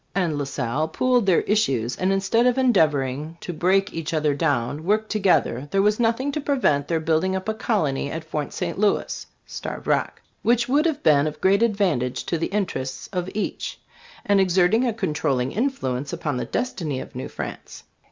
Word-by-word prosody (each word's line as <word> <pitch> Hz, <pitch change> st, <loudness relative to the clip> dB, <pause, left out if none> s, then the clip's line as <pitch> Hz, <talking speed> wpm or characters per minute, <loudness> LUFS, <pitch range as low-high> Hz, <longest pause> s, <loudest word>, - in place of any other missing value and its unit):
] -, -, -40 dB
and 175 Hz, -5 st, +1 dB
La 145 Hz, -1 st, -2 dB
Salle 135 Hz, +2 st, -2 dB
pooled 245 Hz, +6 st, +1 dB
their 185 Hz, -, +4 dB
issues, 135 Hz, -, +1 dB
and 185 Hz, +1 st, 0 dB
instead 195 Hz, +5 st, +2 dB
of 250 Hz, +1 st, +2 dB
endeavoring 155 Hz, -, +1 dB
to 175 Hz, -, -6 dB
break 190 Hz, +4 st, +1 dB
each 165 Hz, 0 st, -3 dB
other 150 Hz, -2 st, +2 dB
down 140 Hz, +1 st, -1 dB
worked 215 Hz, +4 st, 0 dB
together, 180 Hz, -, +1 dB
there 195 Hz, -, +2 dB
was 210 Hz, +2 st, +2 dB
nothing 240 Hz, +4 st, +1 dB
to 300 Hz, -, -3 dB
prevent 195 Hz, -, +1 dB
their 165 Hz, -1 st, 0 dB
building 165 Hz, +4 st, +1 dB
up 190 Hz, +1 st, -4 dB
a 220 Hz, -, +1 dB
colony 155 Hz, -, -1 dB
at 160 Hz, +2 st, -5 dB
Fort 155 Hz, -2 st, -4 dB
St, 175 Hz, 0 st, -4 dB
Louis 210 Hz, -1 st, 0 dB, 0.2 s
[Starved -, -, -6 dB
Rock] -, -, 0 dB, 0.2 s
which 235 Hz, 0 st, +2 dB
would 290 Hz, +6 st, +3 dB
have 305 Hz, -2 st, -2 dB
been 145 Hz, -1 st, +4 dB
of 150 Hz, 0 st, -5 dB
great 195 Hz, +3 st, +3 dB
advantage 185 Hz, -, +1 dB
to 170 Hz, -, -1 dB
the -, -, 0 dB
interests 160 Hz, -10 st, -3 dB
of 180 Hz, 0 st, -2 dB
each, 215 Hz, -, -3 dB, 0.5 s
and 200 Hz, -1 st, +4 dB
exerted 185 Hz, +5 st, +3 dB
a 240 Hz, -, +1 dB
controlling 150 Hz, -, -1 dB
influence 145 Hz, -, -2 dB
upon 145 Hz, -5 st, -2 dB
the -, -, -2 dB
destiny 165 Hz, -, -2 dB
of -, -, -9 dB
New -, -, -5 dB
France. -, -, -7 dB
180 Hz, 190 wpm, -23 LUFS, 145-215 Hz, 0.5 s, their